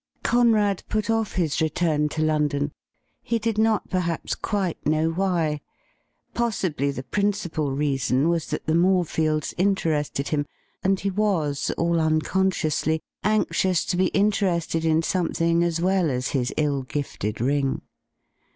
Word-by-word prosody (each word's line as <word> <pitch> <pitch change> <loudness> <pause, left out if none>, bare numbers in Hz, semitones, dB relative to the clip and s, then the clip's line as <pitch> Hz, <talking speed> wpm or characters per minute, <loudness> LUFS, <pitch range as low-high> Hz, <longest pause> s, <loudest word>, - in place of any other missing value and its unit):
Cone 240 -1 +4
AD 205 -3 +1
put 215 +1 0
off 225 -2 0
his 160 -4 0
return 155 -1 +1
to 155 +1 -2
London, 150 -2 +1 0.5
he 230 - -1
did 225 -1 -1
not 220 -1 +2
perhaps 175 -3 -1
quite 195 -5 -2
know 155 +2 +1
why. 165 -4 0 0.7
Possibly 190 - 0
the 135 -2 -4
principal 180 -3 -1
reason 135 -1 +1
was 170 -2 0
that - - -4
the 155 - +1
Morefields 165 -3 +1
interested 160 -7 0
him, 145 -2 -1 0.4
and 195 0 +2
he 195 - -1
was, 180 -8 0
all 170 0 +1
unconsciously, 160 -1 +1 0.2
anxious 190 -4 +1
to - - -1
be 185 +1 +3
interested 185 -6 +1
in 160 0 +3
something 170 -1 +1
as 170 -1 0
well 185 -1 +2
as 125 -1 -1
his 125 -3 -1
ill 145 -3 +1
gifted 130 -5 -4
ring. 135 +2 0
165 Hz, 140 wpm, -24 LUFS, 150-190 Hz, 0.7 s, Cone